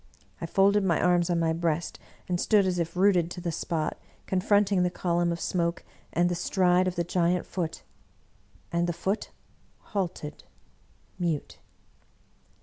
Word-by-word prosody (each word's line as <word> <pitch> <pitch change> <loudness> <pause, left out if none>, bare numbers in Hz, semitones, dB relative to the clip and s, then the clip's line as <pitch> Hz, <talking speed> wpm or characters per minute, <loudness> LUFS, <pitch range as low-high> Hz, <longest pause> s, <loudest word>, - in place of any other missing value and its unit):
I - - -3
folded 200 +1 +3
my 175 -4 +2
arms 175 -1 +3
on 175 - +2
my 165 -1 +1
breast, 165 0 -1 0.3
and 175 -1 -1
stood 210 -3 +4
as 180 -1 0
if 170 0 -2
rooted 180 -3 +3
to 180 - -7
the 175 -1 -2
spot, 160 -1 -2 0.3
confronting 200 0 +2
the 180 - +2
column 175 -1 0
of 170 - -3
smoke 170 -1 -1 0.3
and 175 +2 +2
the 175 - 0
stride 180 +1 +2
of 180 - -2
the 170 - 0
giant 175 +1 +1
Foot. 170 -4 -4 0.9
And 170 0 +1
the 175 - -1
Foot 190 +5 -2 0.5
halted, 175 -7 -4 0.8
mute. 165 -5 -2
175 Hz, 150 wpm, -27 LUFS, 170-185 Hz, 0.9 s, stood